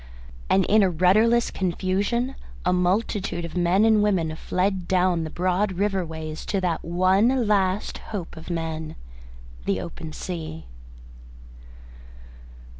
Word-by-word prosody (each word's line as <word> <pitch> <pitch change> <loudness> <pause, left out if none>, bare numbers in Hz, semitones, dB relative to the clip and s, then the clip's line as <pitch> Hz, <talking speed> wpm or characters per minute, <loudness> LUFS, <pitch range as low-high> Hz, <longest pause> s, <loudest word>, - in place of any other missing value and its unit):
And 190 -1 +4
in 215 +1 +4
a 195 - +4
rudderless 215 +8 +3
confusion 200 +7 -1 0.3
a 180 - +3
multitude 180 0 0
of 170 - -8
men 180 +4 +3
and 220 -2 +5
women 175 -7 +1
fled 185 +2 -1
down 180 -2 +2
the - - -5
broad 185 +4 0
river 195 0 0
ways 160 -1 -6
to 195 - 0
that 175 -3 -1
one 190 +9 +2
last 200 -1 +1
hope 190 -6 -6
of 160 +2 -10
men 160 -2 -4 0.7
the 95 -1 0
open 160 - -7
sea. 160 -1 -6
185 Hz, 125 wpm, -24 LUFS, 170-200 Hz, 0.7 s, and